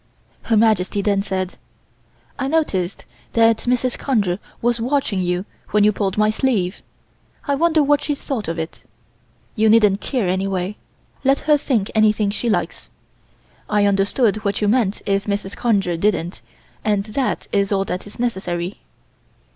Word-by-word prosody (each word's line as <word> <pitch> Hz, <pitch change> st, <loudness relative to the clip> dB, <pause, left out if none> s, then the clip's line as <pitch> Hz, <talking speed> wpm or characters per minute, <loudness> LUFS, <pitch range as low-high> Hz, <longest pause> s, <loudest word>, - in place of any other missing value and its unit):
Her 225 Hz, -, +1 dB
Majesty 205 Hz, -2 st, +2 dB
then 200 Hz, -1 st, +2 dB
said: 190 Hz, -2 st, -3 dB, 0.8 s
"I 270 Hz, -, -1 dB
noticed 205 Hz, -, -1 dB, 0.3 s
that 230 Hz, -1 st, +4 dB
Mrs. 250 Hz, 0 st, 0 dB
Conger 205 Hz, -9 st, 0 dB, 0.2 s
was 235 Hz, 0 st, 0 dB
watching 245 Hz, -6 st, 0 dB
you 180 Hz, +1 st, -1 dB, 0.2 s
when 210 Hz, -1 st, +3 dB
you 210 Hz, -, +5 dB
pulled 195 Hz, -1 st, -2 dB
my 215 Hz, 0 st, +3 dB
sleeve. 215 Hz, -7 st, 0 dB, 0.7 s
I 285 Hz, -, +2 dB
wonder 315 Hz, +1 st, +3 dB
what 290 Hz, 0 st, +3 dB
she 295 Hz, -, -1 dB
thought 260 Hz, -6 st, -4 dB
of 165 Hz, +1 st, -3 dB
it. 160 Hz, 0 st, -5 dB, 0.7 s
You 220 Hz, -1 st, +3 dB
needn't 210 Hz, -3 st, +4 dB
care, 245 Hz, -9 st, -1 dB
anyway. 190 Hz, +1 st, -1 dB, 0.5 s
Let 275 Hz, +1 st, +3 dB
her 300 Hz, -1 st, +4 dB
think 245 Hz, -8 st, 0 dB
anything 215 Hz, -1 st, +3 dB
she 235 Hz, +3 st, -2 dB
likes. 215 Hz, -, -2 dB, 0.8 s
I 210 Hz, -1 st, +3 dB
understood 200 Hz, +3 st, +2 dB
what 205 Hz, -2 st, -2 dB
you 210 Hz, -, +1 dB
meant 215 Hz, -2 st, +1 dB
if 195 Hz, +1 st, 0 dB
Mrs. 200 Hz, -1 st, -2 dB
Conger 200 Hz, -7 st, +1 dB
didn't, 175 Hz, -2 st, -1 dB, 0.4 s
and 205 Hz, -2 st, +1 dB
that 225 Hz, +5 st, -2 dB
is 200 Hz, 0 st, +1 dB
all 195 Hz, -1 st, +1 dB
that 180 Hz, +2 st, -4 dB
is 205 Hz, -, -12 dB
necessary." 190 Hz, -6 st, -2 dB
210 Hz, 155 wpm, -20 LUFS, 195-240 Hz, 0.8 s, you